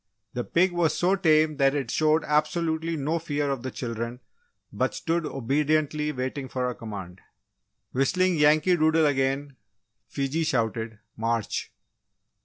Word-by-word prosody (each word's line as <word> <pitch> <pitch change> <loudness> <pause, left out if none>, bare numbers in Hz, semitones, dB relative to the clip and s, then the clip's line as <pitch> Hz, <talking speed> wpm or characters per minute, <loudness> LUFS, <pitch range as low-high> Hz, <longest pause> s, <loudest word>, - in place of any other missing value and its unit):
The 120 - -2
pig 180 +7 +2
was 175 -2 +1
so 185 +2 +3
tame 155 -4 +3
that 135 +1 +3
it 140 -2 -2
showed 155 0 +2
absolutely 160 +2 0
no 155 +4 -1
fear 145 -3 -1
of 135 -3 -3
the 130 - -4
children 115 -1 -5 0.5
but - - -1
stood 165 -1 -1
obediently 150 +3 0
waiting 130 0 -4
for 125 0 -1
a 125 - -2
command. 95 -6 -8 0.7
Whistling 180 +7 +2
Yankee 155 +4 +4
Doodle 160 0 +3
again, 135 0 0 0.5
Fiji 140 +4 -1
shouted 115 -6 -1 0.2
"March!" 115 -1 -2
145 Hz, 135 wpm, -26 LUFS, 130-160 Hz, 0.7 s, Yankee